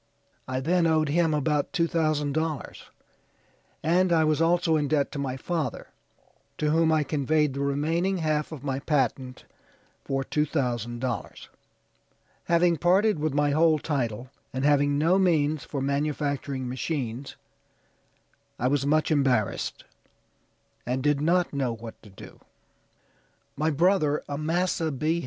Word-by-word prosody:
I 130 Hz, 0 st, -2 dB
then 170 Hz, +4 st, +2 dB
owed 155 Hz, -2 st, +2 dB
him 165 Hz, +2 st, +2 dB
about 150 Hz, +1 st, 0 dB
two 170 Hz, -4 st, +2 dB
thousand 155 Hz, -3 st, 0 dB
dollars, 155 Hz, -3 st, -4 dB, 0.9 s
and 180 Hz, +3 st, +2 dB
I 160 Hz, -2 st, +4 dB
was 155 Hz, 0 st, +1 dB
also 170 Hz, 0 st, +3 dB
in 150 Hz, -2 st, +1 dB
debt 145 Hz, -1 st, +1 dB
to 145 Hz, -, -5 dB
my 135 Hz, -2 st, -3 dB
father, 165 Hz, +3 st, -3 dB, 0.7 s
to 150 Hz, 0 st, 0 dB
whom 160 Hz, 0 st, +3 dB
I 155 Hz, -1 st, +3 dB
conveyed 150 Hz, 0 st, +1 dB
the 140 Hz, -, -5 dB
remaining 160 Hz, +7 st, 0 dB
half 155 Hz, -2 st, -1 dB
of 145 Hz, -4 st, -8 dB
my 135 Hz, -2 st, -2 dB
patent 130 Hz, -3 st, -1 dB, 0.6 s
for 135 Hz, 0 st, -2 dB
two 150 Hz, +3 st, 0 dB
thousand 120 Hz, -5 st, -2 dB
dollars. 125 Hz, -3 st, -5 dB, 1.0 s
Having 170 Hz, 0 st, +3 dB
parted 185 Hz, +3 st, +3 dB
with 150 Hz, -2 st, -1 dB
my 145 Hz, 0 st, +2 dB
whole 155 Hz, +1 st, +4 dB
title, 130 Hz, -5 st, -3 dB, 0.2 s
and 130 Hz, +1 st, -2 dB
having 145 Hz, -1 st, +3 dB
no 170 Hz, +6 st, +3 dB
means 155 Hz, -5 st, +1 dB
for 140 Hz, -, -4 dB
manufacturing 140 Hz, -2 st, -2 dB
machines, 130 Hz, -1 st, -4 dB, 1.2 s
I 125 Hz, -, 0 dB
was 140 Hz, 0 st, 0 dB
much 155 Hz, +2 st, +2 dB
embarrassed, 130 Hz, -9 st, 0 dB, 1.0 s
and 130 Hz, +2 st, -2 dB
did 145 Hz, -1 st, +2 dB
not 175 Hz, +2 st, +1 dB
know 135 Hz, -4 st, -1 dB
what 115 Hz, 0 st, -10 dB
to 105 Hz, -, -15 dB
do." 95 Hz, -, -13 dB, 1.2 s
"My 155 Hz, +2 st, 0 dB
brother, 155 Hz, -1 st, +2 dB
Amasa 160 Hz, +2 st, -1 dB
B. 155 Hz, +5 st, 0 dB
150 Hz, 140 wpm, -26 LUFS, 135-160 Hz, 1.2 s, I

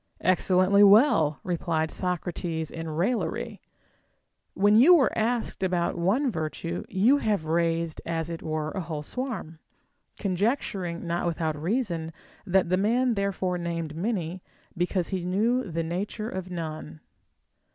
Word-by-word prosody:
Excellently 185 Hz, +2 st, +3 dB
well! 200 Hz, -, +5 dB
repUed 165 Hz, -3 st, -1 dB
Socrates 175 Hz, -3 st, -3 dB
in 165 Hz, 0 st, -5 dB
raillery, 180 Hz, +10 st, -2 dB, 0.9 s
when 205 Hz, +2 st, +4 dB
you 270 Hz, +12 st, +8 dB
were 285 Hz, -6 st, +3 dB
asked 230 Hz, -1 st, -1 dB
about 180 Hz, -2 st, 0 dB
one 220 Hz, +11 st, +1 dB
virtue, 165 Hz, 0 st, -4 dB
you 225 Hz, +10 st, +4 dB
haΛ^e 205 Hz, -, 0 dB
raised, 165 Hz, 0 st, 0 dB
as 165 Hz, -1 st, -2 dB
it 165 Hz, -1 st, -6 dB
were, 155 Hz, 0 st, -3 dB
a 190 Hz, -, -3 dB
whole 160 Hz, -3 st, -5 dB
swarm; 215 Hz, -, -5 dB, 0.6 s
conjecturing, 190 Hz, -3 st, -1 dB
not 170 Hz, +1 st, -1 dB
without 160 Hz, -2 st, -1 dB
reason, 170 Hz, -, -2 dB, 0.4 s
that 185 Hz, -1 st, +2 dB
the 185 Hz, -, +2 dB
man 235 Hz, +5 st, +2 dB
therefore 195 Hz, -3 st, -1 dB
named 165 Hz, -3 st, -4 dB
many 180 Hz, -2 st, -2 dB, 0.3 s
because 175 Hz, 0 st, -1 dB
he 185 Hz, -2 st, -2 dB
knew 215 Hz, +6 st, +1 dB
the 165 Hz, 0 st, -2 dB
nature 200 Hz, +6 st, -3 dB
of 185 Hz, -1 st, -5 dB
none. 155 Hz, -3 st, -6 dB
180 Hz, 130 wpm, -27 LUFS, 165-205 Hz, 0.9 s, you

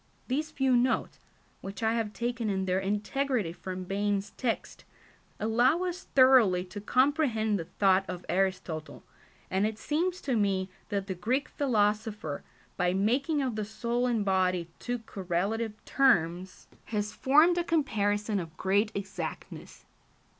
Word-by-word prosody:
These 300 Hz, +5 st, -1 dB
few 265 Hz, -4 st, +2 dB
notes, 245 Hz, +1 st, +1 dB, 0.4 s
which 195 Hz, +3 st, -7 dB
I 220 Hz, 0 st, +2 dB
have 225 Hz, -2 st, -1 dB
taken 235 Hz, 0 st, -2 dB
in 190 Hz, -1 st, -1 dB
their 185 Hz, 0 st, +1 dB
integrity 210 Hz, +1 st, -1 dB
from 185 Hz, +1 st, -6 dB
Bain's 200 Hz, +1 st, -1 dB
text, 240 Hz, -3 st, -3 dB, 0.6 s
allow 240 Hz, -, +3 dB
us 365 Hz, 0 st, -4 dB
thoroughly 255 Hz, -9 st, +6 dB
to 205 Hz, -, -5 dB
comprehend 250 Hz, -4 st, +2 dB
the 165 Hz, -, -4 dB
thought 195 Hz, +2 st, +2 dB
of 180 Hz, -1 st, -6 dB
Aristotle, 175 Hz, -5 st, -2 dB, 0.5 s
and 195 Hz, +3 st, +2 dB
it 215 Hz, -1 st, -5 dB
seems 345 Hz, +9 st, -1 dB
to 260 Hz, -, -1 dB
me 195 Hz, -3 st, 0 dB, 0.2 s
that 200 Hz, -2 st, -1 dB
the 195 Hz, -, -3 dB
Greek 245 Hz, +11 st, -1 dB
philosopher, 210 Hz, -, 0 dB, 0.4 s
by 180 Hz, 0 st, +1 dB
making 275 Hz, -, +1 dB
of 250 Hz, -4 st, -2 dB
the 215 Hz, -, -2 dB
soul 235 Hz, +4 st, -1 dB
and 230 Hz, -4 st, 0 dB
body 185 Hz, -3 st, +1 dB
two 245 Hz, 0 st, -2 dB
correlative 210 Hz, +1 st, -2 dB
terms, 185 Hz, -, +1 dB, 0.2 s
has 210 Hz, -1 st, -2 dB
formed 310 Hz, +6 st, +4 dB
a -, -, +1 dB
comparison 210 Hz, -, 0 dB
of 165 Hz, -3 st, -8 dB
great 200 Hz, +3 st, +1 dB
exactness. 200 Hz, -1 st, -6 dB
210 Hz, 140 wpm, -29 LUFS, 190-255 Hz, 0.6 s, thoroughly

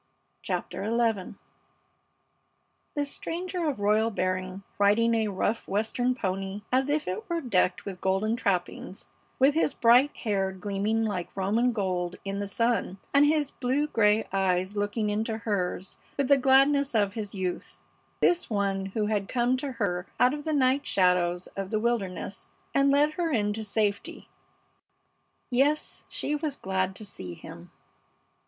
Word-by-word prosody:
CHAPTER -, -, -3 dB
XI 225 Hz, -5 st, 0 dB, 1.6 s
This 290 Hz, -1 st, -1 dB
stranger 350 Hz, -1 st, -3 dB
of 280 Hz, -, -3 dB
royal 215 Hz, +2 st, +3 dB
bearing, 185 Hz, -1 st, -2 dB, 0.2 s
riding 215 Hz, +3 st, +4 dB
a 220 Hz, -1 st, +1 dB
rough 205 Hz, +3 st, -1 dB
Western 225 Hz, +5 st, 0 dB
pony 195 Hz, -1 st, -3 dB
as 260 Hz, +2 st, +2 dB
if 300 Hz, +1 st, 0 dB
it 185 Hz, -, -4 dB
were 340 Hz, -1 st, 0 dB
decked 185 Hz, -, +1 dB
with 190 Hz, -2 st, -6 dB
golden 195 Hz, +4 st, +1 dB
trappings, 190 Hz, -3 st, -2 dB, 0.3 s
with 270 Hz, +2 st, +5 dB
his 315 Hz, -2 st, +1 dB
bright 245 Hz, +5 st, +5 dB
hair 195 Hz, -4 st, 0 dB
gleaming 205 Hz, +3 st, -1 dB
like 190 Hz, -3 st, -4 dB
Roman 220 Hz, +6 st, +2 dB
gold 180 Hz, -5 st, -2 dB
in 195 Hz, 0 st, -3 dB
the 200 Hz, -, -3 dB
sun, 230 Hz, -2 st, 0 dB, 0.2 s
and 285 Hz, +1 st, +6 dB
his 300 Hz, -2 st, +1 dB
blue 265 Hz, +4 st, 0 dB
gray 220 Hz, -6 st, +2 dB
eyes 190 Hz, 0 st, +1 dB
looking 205 Hz, +1 st, -1 dB
into 220 Hz, +1 st, -1 dB
hers 195 Hz, -4 st, -3 dB, 0.2 s
with 280 Hz, -2 st, 0 dB
the 280 Hz, -, +8 dB
gladness 275 Hz, +1 st, +4 dB
of 200 Hz, -2 st, +2 dB
his 210 Hz, -2 st, -5 dB
youth; 185 Hz, -2 st, -4 dB, 0.4 s
this 355 Hz, 0 st, +3 dB
one 195 Hz, -2 st, 0 dB
who 210 Hz, +2 st, -1 dB
had 210 Hz, -2 st, -1 dB
come 245 Hz, 0 st, +1 dB
to 270 Hz, 0 st, -4 dB
her 195 Hz, -6 st, -2 dB
out 250 Hz, +2 st, +5 dB
of 295 Hz, 0 st, -6 dB
the 315 Hz, -, 0 dB
night 270 Hz, 0 st, +3 dB
shadows 180 Hz, -1 st, +2 dB
of 195 Hz, -1 st, -4 dB
the 215 Hz, -, 0 dB
wilderness 215 Hz, -5 st, -2 dB, 0.3 s
and 275 Hz, 0 st, +4 dB
led 290 Hz, +2 st, +3 dB
her 335 Hz, 0 st, -1 dB
into 215 Hz, -3 st, 0 dB
safety! 210 Hz, -1 st, -2 dB, 1.2 s
Yes, 285 Hz, +5 st, +1 dB
she 295 Hz, -, -3 dB
was 295 Hz, -2 st, -3 dB
glad 190 Hz, -2 st, -1 dB
to 215 Hz, -, -7 dB
see 90 Hz, -, -8 dB
him. 85 Hz, +1 st, -11 dB
215 Hz, 150 wpm, -27 LUFS, 195-260 Hz, 1.6 s, the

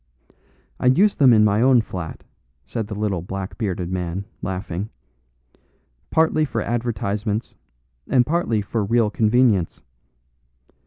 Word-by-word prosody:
"I -, -, +1 dB
use 190 Hz, +11 st, +5 dB
them 135 Hz, -4 st, +5 dB
in 110 Hz, -2 st, +6 dB
my 105 Hz, +1 st, +2 dB
own 125 Hz, -1 st, +5 dB
flat," 90 Hz, -6 st, -7 dB, 0.4 s
said 110 Hz, -, -4 dB
the 105 Hz, -, -6 dB
little 100 Hz, -4 st, -1 dB
black 95 Hz, +3 st, -6 dB
bearded 90 Hz, -5 st, -2 dB
man, 90 Hz, +1 st, -3 dB, 0.2 s
laughing, 95 Hz, +1 st, -4 dB, 1.2 s
"partly 160 Hz, -1 st, +2 dB
for 150 Hz, -, -2 dB
advertisements, 110 Hz, -2 st, -2 dB, 0.6 s
and 125 Hz, -2 st, +4 dB
partly 135 Hz, -10 st, 0 dB
for 110 Hz, +2 st, -2 dB
real 110 Hz, +1 st, +2 dB
convenience. 110 Hz, -5 st, +2 dB
105 Hz, 120 wpm, -22 LUFS, 95-120 Hz, 1.2 s, in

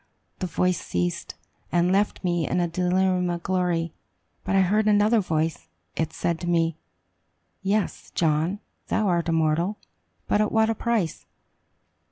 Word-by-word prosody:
The 185 Hz, -, -2 dB
voice 180 Hz, +1 st, 0 dB
ceased, 90 Hz, 0 st, -2 dB, 0.4 s
and 175 Hz, +1 st, +3 dB
left 200 Hz, +2 st, +1 dB
me 175 Hz, -3 st, 0 dB
in 180 Hz, -, 0 dB
the 175 Hz, -1 st, +2 dB
delirium 180 Hz, +1 st, +1 dB
of 170 Hz, -1 st, -3 dB
glory. 175 Hz, -3 st, 0 dB, 0.5 s
But 195 Hz, -, 0 dB
I 190 Hz, -, +5 dB
heard 210 Hz, +4 st, +2 dB
another 210 Hz, +2 st, +4 dB
voice. 160 Hz, -, -1 dB, 0.3 s
It 160 Hz, -1 st, -1 dB
said 170 Hz, 0 st, -1 dB
to 175 Hz, -, -5 dB
me, 165 Hz, -2 st, +2 dB, 0.9 s
"Yes, 200 Hz, 0 st, -1 dB
John, 165 Hz, +5 st, +1 dB, 0.3 s
thou 215 Hz, -, +1 dB
art 170 Hz, -2 st, +1 dB
immortal. 165 Hz, +5 st, +1 dB, 0.5 s
But 210 Hz, -, +2 dB
at 215 Hz, -, +1 dB
what 220 Hz, 0 st, +3 dB
a -, -, +1 dB
price? 225 Hz, -7 st, -1 dB
180 Hz, 150 wpm, -25 LUFS, 165-200 Hz, 0.9 s, I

